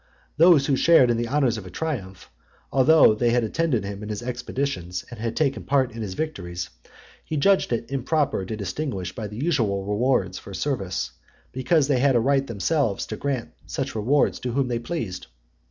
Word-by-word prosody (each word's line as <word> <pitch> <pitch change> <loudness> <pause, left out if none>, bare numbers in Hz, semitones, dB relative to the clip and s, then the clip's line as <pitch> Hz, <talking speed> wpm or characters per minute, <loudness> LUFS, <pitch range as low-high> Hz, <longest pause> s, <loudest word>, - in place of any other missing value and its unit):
Those 165 -3 +6
who 140 - +2
shared 130 -4 +5
in 115 - +1
the 120 0 -1
honours 130 -4 +1
of 95 - -10
a - - -8
triumph, 100 - -5 0.4
although 140 -2 +6
they 120 +3 +1
had 120 0 +2
attended 125 - 0
him 100 +1 -6
in 105 - -6
his 105 +1 -4
expeditions, 120 -7 -3
and 115 -1 -4
taken 140 -3 +1
part 135 -2 +1
in 115 0 -7
his 95 -4 -4
victories, 90 - -4 0.5
he 155 - -4
judged 195 +3 +3
it 115 +1 -2
improper 140 -3 0
to 105 +4 -5
distinguish 95 - -4
by 110 +1 -5
the 105 +1 -9
usual 115 - 0
rewards 105 -3 0
for 100 - -9
service, 100 -10 -2 0.4
because 135 +3 +2
they 140 -4 +2
had 135 0 +3
a - - +5
right 135 +3 +2
themselves 115 - 0
to - - -5
grant 135 -5 -3 0.2
such - - -3
rewards 125 +7 +1
to 125 -2 -4
whom 135 -1 0
they 120 -1 -1
pleased. 115 - -5
120 Hz, 185 wpm, -24 LUFS, 105-140 Hz, 0.5 s, Those